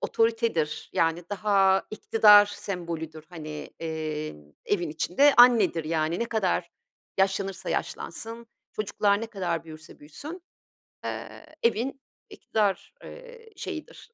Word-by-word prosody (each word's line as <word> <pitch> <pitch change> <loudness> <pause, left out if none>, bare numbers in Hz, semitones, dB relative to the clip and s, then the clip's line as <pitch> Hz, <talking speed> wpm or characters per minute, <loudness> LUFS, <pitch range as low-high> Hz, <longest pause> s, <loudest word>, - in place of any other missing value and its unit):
otoritedir, 225 -9 0
yani 165 +1 +1
daha 195 -2 +3
iktidar 210 -1 +6
sembolüdür, 170 -6 -6
hani, 155 -3 -8
eee, 155 - -4 0.3
evin 175 -6 0
içinde 230 - +3
annedir 235 -9 +6
yani 160 +1 0
ne - - 0
kadar 190 -6 -1 0.5
yaşlanırsa 195 0 0
yaşlansın, 230 +1 -4 0.3
çocuklar 205 0 +1
ne 230 - -3
kadar 185 -7 -3
büyürse 155 -1 -12
büyüsün, 300 - -9 0.6
eee, - - -6 0.2
evin 240 +4 0 0.3
iktidar, 205 -3 -1
eee, 485 -2 -12
şeyidir, 380 +6 -8
195 Hz, 105 wpm, -27 LUFS, 165-230 Hz, 0.6 s, iktidar